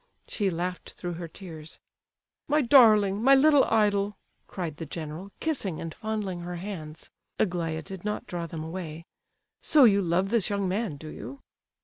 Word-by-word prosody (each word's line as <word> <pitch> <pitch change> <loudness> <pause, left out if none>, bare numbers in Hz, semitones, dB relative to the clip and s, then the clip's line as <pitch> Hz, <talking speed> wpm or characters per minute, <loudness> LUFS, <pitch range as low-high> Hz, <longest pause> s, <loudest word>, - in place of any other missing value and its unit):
She 205 -3 -1
laughed 180 +1 -4
through 175 -1 -5
her 170 0 -6
tears. 160 -2 -10 0.7
"My 300 0 +3
darling, 215 -6 +6
my 270 +3 +7
little 290 0 +6
idol," 205 -2 +1 0.3
cried 170 -5 -5
the 165 - -5
general, 160 +5 -7
kissing 230 - -2
and 165 -1 -5
fondling 210 -4 -3
her 175 +1 -5
hands 170 -4 -7 0.3
(Aglaya 165 -4 -1
did 190 0 -8
not 210 0 -3
draw 170 -1 -4
them 160 -1 -6
away); 165 -1 -6 0.6
"so 300 -3 +5
you 200 -4 +6
love 180 +2 +1
this 225 -4 +1
young 200 -2 -1
man, 190 -4 -2
do 155 +2 -9
you?" 135 0 -9
185 Hz, 160 wpm, -27 LUFS, 165-210 Hz, 0.7 s, my